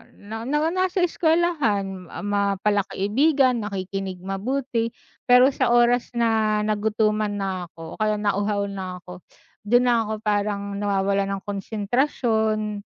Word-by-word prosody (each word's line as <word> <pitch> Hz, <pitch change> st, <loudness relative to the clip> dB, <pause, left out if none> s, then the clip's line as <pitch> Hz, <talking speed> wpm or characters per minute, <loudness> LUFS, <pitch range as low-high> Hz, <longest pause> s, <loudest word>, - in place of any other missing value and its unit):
na 220 Hz, +2 st, -8 dB
na 295 Hz, +2 st, +1 dB
nasa 370 Hz, 0 st, +1 dB
eskwelahan 300 Hz, -, 0 dB, 0.2 s
ma 200 Hz, -1 st, +1 dB
pala 205 Hz, -1 st, +3 dB
kaibigan, 255 Hz, +4 st, +2 dB
nakikinig 195 Hz, -1 st, -4 dB
mabuti 230 Hz, +4 st, -2 dB, 0.4 s
pero 250 Hz, +2 st, +6 dB
sa -, -, +1 dB
oras 240 Hz, 0 st, +3 dB
na 220 Hz, -2 st, +2 dB
nagutuman 215 Hz, 0 st, +1 dB
na 190 Hz, -3 st, -3 dB
ako 165 Hz, -1 st, -10 dB
o -, -, -19 dB
kaya 215 Hz, 0 st, +1 dB
nauhaw 205 Hz, 0 st, 0 dB
na 185 Hz, -2 st, -5 dB
ako 180 Hz, 0 st, -10 dB, 0.5 s
dun 245 Hz, +3 st, +4 dB
na 240 Hz, -2 st, +3 dB
ako 215 Hz, 0 st, -5 dB
parang 200 Hz, -1 st, -1 dB
nawawalan 200 Hz, -1 st, +1 dB
ng -, -, -10 dB
konsentrasyon 215 Hz, 0 st, -1 dB
210 Hz, 130 wpm, -23 LUFS, 200-240 Hz, 0.5 s, pero